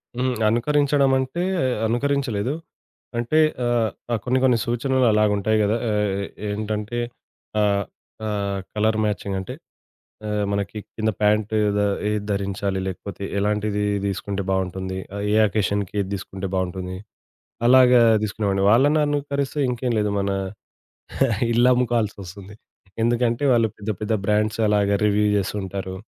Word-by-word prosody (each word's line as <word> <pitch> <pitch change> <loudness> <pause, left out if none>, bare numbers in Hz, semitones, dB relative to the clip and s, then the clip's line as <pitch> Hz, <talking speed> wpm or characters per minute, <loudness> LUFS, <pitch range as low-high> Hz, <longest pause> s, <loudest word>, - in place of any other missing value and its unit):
హ్మ్. 125 +1 0 0.2
అనుకరించడం 140 +3 +2
అంటే 130 +7 -2 0.4
అనుకరించలేదు. 125 -1 0 0.6
అంటే, 120 +7 +1 0.3
ఆహ్, 120 0 -1
కొన్ని, 130 +1 +1
కొన్ని 125 -2 +4
సూచనలు 125 +2 +1
అలా 105 0 +3
ఉంటాయి 110 +2 +1
కదా! 105 +2 +2
ఆహ్, 105 -2 0 0.3
ఏంటంటే, 105 +2 -3 0.6
ఆహ్, 100 -1 +2 0.4
ఆహ్, 100 -2 -2 0.2
కలర్ 110 +1 +2
మ్యాచింగ్ 100 -1 -2
అంటే 95 - -6 0.8
ఆహ్, 105 -1 0
మనకి 100 +1 -2 0.2
కింద 110 0 +1
ప్యాంటు 105 +1 +2 0.2
ద 105 - +2 0.3
ఏది 105 -1 -1
ధరించాలి, 100 -1 -1
లేకపోతే 95 +1 -6
ఎలాంటిది 105 0 0 0.2
తీసుకుంటే 100 0 -3
బావుంటుంది, 95 0 -2 0.2
ఆహ్, 100 - -3
ఏ - - +4
అకేషన్‌కి 100 -1 -1
ఏది 100 0 -3
తీసుకుంటే 95 0 -5
బావుంటుంది, 95 0 -3 0.7
అలాగా 125 -1 +7 0.2
తీసుకునేవాడిని. 100 -2 -1
వాళ్ళని 145 +7 +4
అనుకరిస్తే 145 0 -2
ఇంకేం 125 0 -1
లేదు 105 - +1
మన 100 0 -1 1.2
ఇల్లు 120 +2 +4
అమ్ముకోవాల్సొస్తుంది. 105 -5 -2 0.5
ఎందుకంటే 120 +2 +1
వాళ్ళు 115 -2 +3
పెద్ద, 105 +1 -5
పెద్ద 110 +1 0
బ్రాండ్సలాగా 105 -1 +2
రివ్యూ 105 0 +2
చేస్తూ 100 +1 -2
ఉంటారు. 95 0 -5
105 Hz, 120 wpm, -23 LUFS, 100-120 Hz, 1.2 s, అలాగా